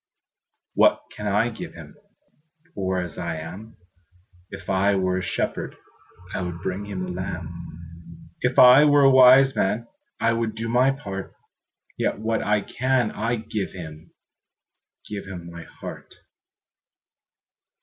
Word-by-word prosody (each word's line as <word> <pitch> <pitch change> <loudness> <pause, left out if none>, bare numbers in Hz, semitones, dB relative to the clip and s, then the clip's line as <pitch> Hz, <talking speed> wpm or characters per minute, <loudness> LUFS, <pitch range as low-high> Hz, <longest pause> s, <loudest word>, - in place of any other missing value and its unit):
What - - +4
can 105 - -5
I 105 +4 +2
give 115 - -8
Him, - - -12 0.8
Poor 95 -7 -2
as 90 -2 -4
I 85 -1 -3
am? 90 +8 -9 0.7
If - - -10
I 100 +1 +2
were 95 -1 0
a - - -4
shepherd, 90 - -3 0.6
I - - -2
would 90 -1 -5
bring 100 +2 -4
a - - -5
lamb; 85 -2 -7
If 125 0 0
I 125 +3 +9
were 145 -1 +5
a 135 - +7
wise 130 +1 +7
man, 105 +4 0 0.3
I 115 - +2
would 115 -1 -2
do 115 +1 -4
my 125 +3 +3
part: 100 -8 -5 0.6
Yet - - 0
what 110 +1 -1
I 105 0 +1
can 125 0 0
I 115 +3 -1
give 110 -3 -4
Him, 80 -3 -10 1.0
Give 100 -2 -6
my 85 -3 -9
heart. - - -10
100 Hz, 135 wpm, -24 LUFS, 90-115 Hz, 1.0 s, I